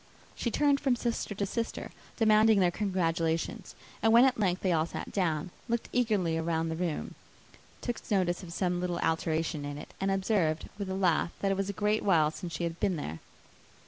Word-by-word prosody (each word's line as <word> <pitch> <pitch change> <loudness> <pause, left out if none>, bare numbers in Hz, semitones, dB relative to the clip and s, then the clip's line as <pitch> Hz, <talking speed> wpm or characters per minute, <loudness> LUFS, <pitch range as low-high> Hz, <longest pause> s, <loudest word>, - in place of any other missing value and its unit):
She 235 - -1
turned 285 +4 +3
from 270 -4 +2
sister 235 -3 -2
to 200 - -1
sister, 230 +3 -4 0.3
demanding 215 -1 +5
their 180 -2 +4
congratulations; 165 -4 -1 0.3
and 225 - +4
when 235 +3 +8
at 255 -3 +2
length 185 -3 +1
they 185 - +2
all 160 -1 +2
sat - - -6
down, 175 -3 -1 0.2
looked 235 0 -1
eagerly 205 -9 +1
round 165 0 -1
the - - -2
room, 170 -2 -3 0.7
took 240 -2 -3
notice 185 -3 +1
of 175 -3 -9
some 180 0 -1
little 180 -1 -1
alteration 160 -1 0
in 145 0 -5
it, 150 - -10
and 195 - +1
observed, 190 -5 +1
with 200 -2 -3
a 190 - -2
laugh, 180 -3 +2
that 195 - +1
it - - +2
was 195 0 -2
a - - +1
great 210 +2 +1
while 160 -6 +3
since 175 +1 -7
she - - -3
had 170 0 -3
been 185 - +1
there. 80 - -5
185 Hz, 200 wpm, -30 LUFS, 165-210 Hz, 0.7 s, when